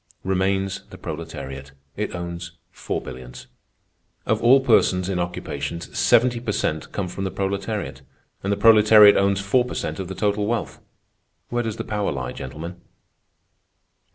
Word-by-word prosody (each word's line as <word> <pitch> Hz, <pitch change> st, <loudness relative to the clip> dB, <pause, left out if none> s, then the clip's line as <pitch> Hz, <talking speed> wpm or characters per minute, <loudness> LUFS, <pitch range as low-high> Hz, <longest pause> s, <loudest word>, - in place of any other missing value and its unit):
Remains 95 Hz, +1 st, 0 dB
the -, -, -11 dB
proletariat. 70 Hz, -4 st, -7 dB, 0.2 s
It 105 Hz, -2 st, -3 dB
owns 85 Hz, 0 st, -6 dB, 0.2 s
four -, -, -4 dB
billions. 65 Hz, -1 st, -10 dB, 0.8 s
Of 110 Hz, 0 st, +1 dB
all 125 Hz, +4 st, +7 dB
persons 95 Hz, -8 st, +3 dB
in 95 Hz, -2 st, -1 dB
occupations, 85 Hz, -2 st, -4 dB
seventy 120 Hz, 0 st, +4 dB
per 115 Hz, -3 st, -3 dB
cent 80 Hz, -4 st, -2 dB
come 100 Hz, -3 st, -2 dB
from 95 Hz, +2 st, -5 dB
the 95 Hz, -, -1 dB
proletariat; 100 Hz, -4 st, -3 dB, 0.4 s
and 100 Hz, -, -2 dB
the 100 Hz, -, +1 dB
proletariat 105 Hz, -1 st, +8 dB
owns 100 Hz, 0 st, +2 dB
four 110 Hz, +6 st, +2 dB
per 125 Hz, -, -6 dB
cent -, -, -3 dB
of 95 Hz, -, -4 dB
the 95 Hz, -, -6 dB
total 105 Hz, 0 st, 0 dB
wealth. 110 Hz, -7 st, -2 dB, 0.7 s
Where 120 Hz, 0 st, 0 dB
does 115 Hz, -2 st, -4 dB
the -, -, -3 dB
power 105 Hz, -2 st, -1 dB
lie, 65 Hz, -3 st, -4 dB
gentlemen?" 80 Hz, +7 st, -8 dB
95 Hz, 155 wpm, -23 LUFS, 85-105 Hz, 0.8 s, proletariat